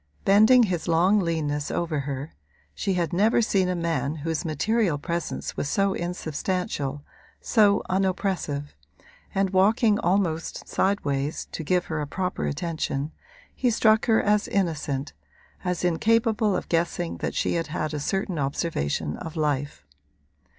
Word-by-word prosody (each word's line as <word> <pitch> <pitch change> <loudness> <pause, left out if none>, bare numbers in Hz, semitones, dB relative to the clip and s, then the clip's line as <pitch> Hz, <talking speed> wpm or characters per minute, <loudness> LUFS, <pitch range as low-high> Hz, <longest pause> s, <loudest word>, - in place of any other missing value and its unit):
Bending 220 +5 +6
his 180 -6 -1
long 175 +5 +4
leanness 150 -5 -1
over 165 -3 -1
her 140 +1 -5 0.4
(she 195 -3 -1
had 175 -1 -1
never 210 +6 +3
seen 195 -5 +2
a 180 - 0
man 165 -3 -1
whose 160 +2 -3
material 180 +2 +1
presence 170 +3 -4
was 145 - -2
so 195 +2 +2
insubstantial, 165 -4 -3 0.4
so 205 -3 +3
unoppressive) 185 -6 -1 0.6
and 195 -1 +1
walking 210 +3 +3
almost 175 -4 -1
sidewise, 150 -6 -1
to 160 - -5
give 180 +3 +1
her 160 -2 -3
a 145 - -3
proper 180 - -2
attention, 150 - -2 0.4
he 250 - +1
struck 220 -1 +3
her 225 -1 +5
as 210 0 +2
innocent, 155 -7 -1 0.5
as 180 -1 -2
incapable 220 +3 +2
of - - -3
guessing 170 0 -1
that - - -3
she - - 0
had 165 -2 -1
had 155 0 -3
a 150 - -2
certain 190 +2 -2
observation 80 - -1
of 165 0 -7
life. 145 - -2
175 Hz, 140 wpm, -25 LUFS, 150-195 Hz, 0.6 s, Bending